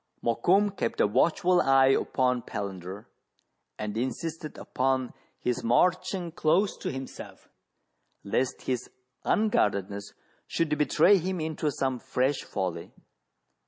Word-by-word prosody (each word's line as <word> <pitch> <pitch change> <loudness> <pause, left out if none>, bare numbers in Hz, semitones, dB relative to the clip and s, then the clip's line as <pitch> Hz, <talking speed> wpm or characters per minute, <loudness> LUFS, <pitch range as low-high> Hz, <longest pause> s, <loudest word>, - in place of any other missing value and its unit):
Mokoum 190 - +2
kept 115 - -2
a - - +5
watchful 170 - +3
eye 135 0 +5
upon 125 -2 +1
Palander, 100 -1 -6 0.7
and 105 -1 -4
insisted 155 +6 -4
upon 130 -1 -1 0.2
his 125 0 -2
marching 175 - +1
close 175 +5 +2
to - - -4
himself, 135 -1 -8 0.8
lest 130 +6 -1
his 125 -2 -2 0.4
unguardedness 100 - 0 0.3
should 155 -2 0
betray 155 +7 +4
him 185 +1 -2
into 155 -1 -1
some 130 -2 -1
fresh 130 +2 0
folly. 85 -3 -4
130 Hz, 110 wpm, -28 LUFS, 115-165 Hz, 0.8 s, a